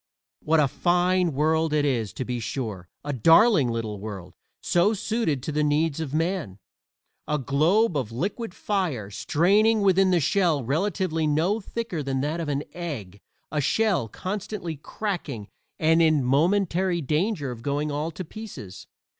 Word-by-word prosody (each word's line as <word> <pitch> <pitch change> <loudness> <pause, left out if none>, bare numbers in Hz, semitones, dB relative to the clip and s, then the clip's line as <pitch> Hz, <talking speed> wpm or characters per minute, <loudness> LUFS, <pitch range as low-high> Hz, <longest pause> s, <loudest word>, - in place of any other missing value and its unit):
What 160 +1 +2
a 150 - +4
fine 180 +3 +2
world 160 +2 +1
it 150 -1 +2
is, 115 -7 0
to 130 - -4
be 125 0 -3
sure 110 -6 -5
a 145 0 -3
darling 165 - +5
little 110 -3 -3
world, 95 -4 -7 0.3
"so 190 +6 +2
suited 195 - -1
to 155 - -3
the 150 +1 +1
needs 150 +1 +1
of 155 -4 -4
man." 160 - -1 0.7
A 150 - +1
globe 155 - +2
of 130 -6 -2
liquid 195 - -3
fire, 160 - -2
straining 205 - +3
within 190 -1 +4
a - - +3
shell 165 -2 +2
relatively 165 - 0
no 165 +9 +1
thicker 205 -5 -4
than 135 -1 -2
that 150 +4 -2
of 160 -3 -3
an 145 0 -1
egg 115 - -6 0.3
a 150 0 0
shell 190 - +1
constantly 185 - -5
cracking 150 - -5 0.3
and 160 +1 +3
in 155 -4 +4
momentary 175 +5 +2
danger 155 - -1
of 120 -2 -8
going 145 +3 -1
all 150 +3 -2
to 175 +3 -7
pieces! 185 - -9
155 Hz, 155 wpm, -25 LUFS, 135-185 Hz, 0.7 s, darling